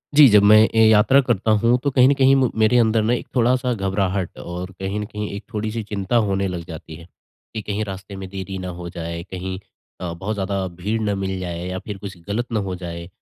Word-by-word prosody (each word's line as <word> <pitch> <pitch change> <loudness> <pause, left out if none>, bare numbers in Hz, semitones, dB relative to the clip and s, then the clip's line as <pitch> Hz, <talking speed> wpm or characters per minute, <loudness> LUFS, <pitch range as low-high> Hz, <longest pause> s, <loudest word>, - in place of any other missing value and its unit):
जी, 150 -2 +9
जब 105 -1 +6
मैं 105 +1 +8 0.2
ए 110 - +5
यात्रा 110 +5 +5
करता 110 -2 +1
हूँ, 115 +3 +3
तो 145 - +2
कहीं 130 -1 +5
न - - +5
कहीं 135 -1 +4
म 130 -2 +3
मेरे 110 +3 +4
अंदर 110 -1 +3
ना 115 +3 +2
एक 125 - -3
थोड़ा-सा 125 +1 +2
घबराहट 95 -2 -1
और 90 +2 -6
कहीं 95 +2 -3
न 105 - -3
कहीं 105 -1 -5
एक 100 - -7
थोड़ी-सी 110 +1 -2
चिंता 105 +1 -3
होने 100 -1 0
लग 90 -2 -5
जाती 80 -1 -9
है। 85 +1 -12 0.5
कि 110 - -3
कहीं 105 +1 -3
रास्ते 95 0 -8
में 95 -1 -7
देरी 95 0 -6
ना 95 -1 -5
हो 85 0 -6
जाए, 85 0 -5
कहीं 95 0 -4 0.4
अ, 90 -2 -3
बहुत 95 +6 -4
ज़्यादा 95 -1 -2
भीड़ 105 +4 -1
ना 105 -2 0
मिल 95 -1 -3
जाए 85 -1 -5
या 90 0 -4
फिर 105 -2 -5
कुछ 95 -1 -8
गलत 110 +4 -1
ना 110 - +1
हो 95 -2 -3
जाए। 85 -1 -7
100 Hz, 235 wpm, -21 LUFS, 95-110 Hz, 0.5 s, जी